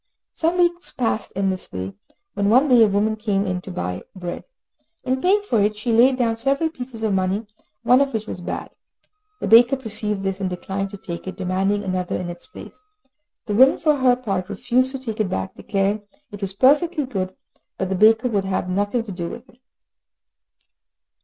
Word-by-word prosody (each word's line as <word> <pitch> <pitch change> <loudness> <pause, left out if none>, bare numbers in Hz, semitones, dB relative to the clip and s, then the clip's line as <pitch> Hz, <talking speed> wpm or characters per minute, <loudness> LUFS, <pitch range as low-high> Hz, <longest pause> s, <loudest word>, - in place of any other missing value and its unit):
Some 335 +2 0
weeks 350 0 +1
passed 230 -4 -2
in 195 0 0
this 185 - -5
way, 95 +1 -5 0.4
when 200 0 0
one 255 +6 +5
day 245 -3 +7
a - - +5
woman 210 +2 +1
came 205 -2 -1
in 180 -2 -2
to 190 - -10
buy 90 - -4
bread. 175 -2 -6 0.6
In 260 0 -1
paying 400 +3 +3
for 235 - +1
it, 210 +1 +1
she 235 +3 -2
laid 250 +3 +5
down 230 -3 +1
several 275 +7 0
pieces 250 -6 -7
of 215 -2 +1
money, 190 +3 0 0.4
one 250 +3 +5
of 280 -1 +1
which 220 -3 -3
was 180 - -6
bad. - - -5 0.7
The - - -1
baker 240 +4 +7
perceived 215 -4 -2
this, 195 0 -2
and 190 - 0
declined 195 +2 -4
to 200 - -9
take 170 -1 -7
it, 190 - -6
demanding 195 +2 0
another 185 -2 -2
in 175 -1 -4
its 175 0 -12
place. - - -12 0.6
The 210 - -2
woman, 260 +6 +6
for 305 -2 +2
her 255 -2 +4
part, 195 -7 -3
refused 245 +5 +1
to - - -2
take 230 -5 -6
it 210 -3 +1
back, 95 - -3
declaring 200 +1 -1 0.3
it 205 0 -9
was 195 -1 -2
perfectly 295 - +3
good, 185 -6 -4 0.4
but 190 - -2
the - - 0
baker 220 +5 +5
would 205 -5 0
have 190 -1 -1
nothing 205 +5 0
to 220 - -8
do 175 -2 -4
with 245 - -9
it. 245 - -22
215 Hz, 200 wpm, -22 LUFS, 190-255 Hz, 0.7 s, day